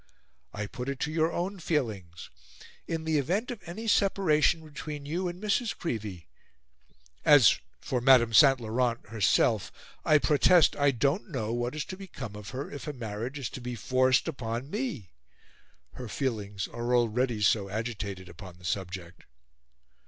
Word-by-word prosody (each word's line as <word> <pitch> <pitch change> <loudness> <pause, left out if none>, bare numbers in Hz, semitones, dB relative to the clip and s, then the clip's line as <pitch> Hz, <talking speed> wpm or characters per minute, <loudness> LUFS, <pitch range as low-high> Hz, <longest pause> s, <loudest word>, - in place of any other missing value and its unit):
I 105 0 -4
put 125 +5 -6
it 140 -1 -4
to 150 - -1
your 160 +1 +1
own 185 +4 -3
feelings 110 - -3 0.6
in 165 -1 -3
the 160 -2 +1
event 200 - -1
of 235 -5 -7
any 215 +7 -6
separation 170 -6 +3
between 150 -1 -7
you 175 +5 -2
and 175 0 -5
Mrs. 215 +2 0
Creevey... 105 - -4 1.0
As 135 -8 +7 0.2
for 125 -2 -2
Madame 120 -3 +5
St. 135 +2 +7
Laurent 120 +1 0
herself, 110 -3 +2 0.3
I 155 - +5
protest 155 +3 +4
I 145 -1 +3
don't 140 - 0
know 115 -8 -3
what 120 +3 -2
is 150 - -3
to 185 - -7
become 140 - -8
of 105 -2 -8
her 130 +5 -5
if 145 -1 -7
a 150 - -3
marriage 115 +2 -5
is 135 -5 -4
to 130 - -7
be 120 0 -5
forced 130 +4 +2
upon 125 -2 -4
me; 200 - -4 0.8
her 125 - -7
feelings 105 -5 -3
are 120 +1 -1
already 120 0 +1
so 100 -1 +2
agitated 100 -3 -4
upon 95 -3 -11
the 90 - -14
subject." 90 -2 -4
130 Hz, 160 wpm, -29 LUFS, 110-155 Hz, 1.0 s, As